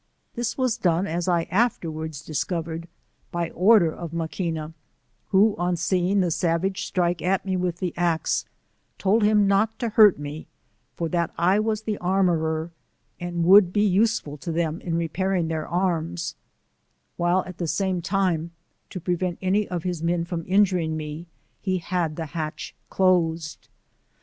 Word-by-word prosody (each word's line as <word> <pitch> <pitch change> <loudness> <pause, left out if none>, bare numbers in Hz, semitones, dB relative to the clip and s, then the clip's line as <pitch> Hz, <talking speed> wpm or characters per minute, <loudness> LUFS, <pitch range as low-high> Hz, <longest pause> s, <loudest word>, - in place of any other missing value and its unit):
This 240 0 -3
was 255 -3 +1
done 175 +1 +2
as 175 0 -2
I 170 -2 +2
afterwards 160 - -1
discovered, 165 +1 -3 0.4
by 170 -1 -2
order 185 -3 +4
of 170 -2 -7
Maquina, 165 -1 -3 0.5
who 200 +2 +4
on 175 0 +1
seeing 185 +3 +1
the 175 -2 0
savage 180 +4 0
strike 175 -2 0
at 190 +2 0
me 190 -1 -1
with 180 -2 -1
the 180 -2 -3
axe, 170 -2 0 0.5
told 205 +4 +2
him 210 -1 +4
not 210 +3 +2
to 235 - -2
hurt 210 -3 +6
me, 145 +2 -7 0.5
for 170 - -2
that 170 -1 0
I 185 +4 +3
was 215 0 -1
the 215 -2 -3
armourer, 170 -3 +1 0.5
and 175 -1 -2
would 190 0 +7
be 210 +2 +2
useful 200 -6 +1
to 165 +4 -5
them 165 0 -1
in 170 -2 -2
repairing 170 +1 0
their 160 -1 -3
arras: 170 -2 -1 0.8
while 175 +2 +2
at 185 -2 -10
the 170 - -1
same 190 +1 0
time 180 -3 0 0.4
to 185 - -6
prevent 180 0 -1
any 195 +2 +1
of 175 -3 -4
his 180 -3 -3
men 170 0 0
from 170 -1 -4
injuring 185 -5 +2
me, 155 +2 -6 0.3
he 185 -2 0
had 170 -2 -2
the 165 - -4
hatch 155 +1 -5 0.2
closed. 165 -4 +1
175 Hz, 155 wpm, -24 LUFS, 165-190 Hz, 0.8 s, would